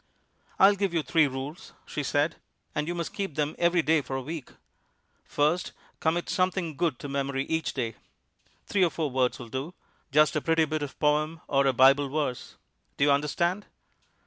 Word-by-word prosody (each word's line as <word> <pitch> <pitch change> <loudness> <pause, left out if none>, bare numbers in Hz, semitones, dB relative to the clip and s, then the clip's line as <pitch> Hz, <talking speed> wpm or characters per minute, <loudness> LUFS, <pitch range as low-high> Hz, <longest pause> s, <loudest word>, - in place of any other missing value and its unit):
"I'll 195 +2 +7
give 195 -3 -1
you 165 - +1
three 150 +3 +3
rules," 135 +5 -7
she 150 - -4
said, 145 +3 0 0.4
"and 150 0 -2
you 175 - -2
must 170 -1 -4
keep 195 -8 -4
them 150 0 0
every 170 -1 +3
day 160 0 +3
for 135 - -5
a 135 - -2
week. 155 -1 -6 0.7
First, 155 +5 0 0.3
commit 170 +2 0
something 185 -4 0
good 155 -3 0
to - - -7
memory 140 -1 -2
each 160 0 -1
day. 115 -4 -2 0.7
Three 195 -2 +2
or 175 - +4
four 155 -3 -3
words 125 -1 +1
will 120 -2 -9
do, 135 +9 -5 0.4
just 150 +2 +4
a 150 - +1
pretty 165 0 +2
bit 155 0 -3
of 145 -2 -5
poem, 155 +2 +1
or 140 -1 +2
a - - +5
Bible 135 +3 +5
verse. 140 -3 -3 0.4
Do - - +2
you 145 - +5
understand?" 170 +7 0
150 Hz, 185 wpm, -27 LUFS, 140-170 Hz, 0.7 s, I'll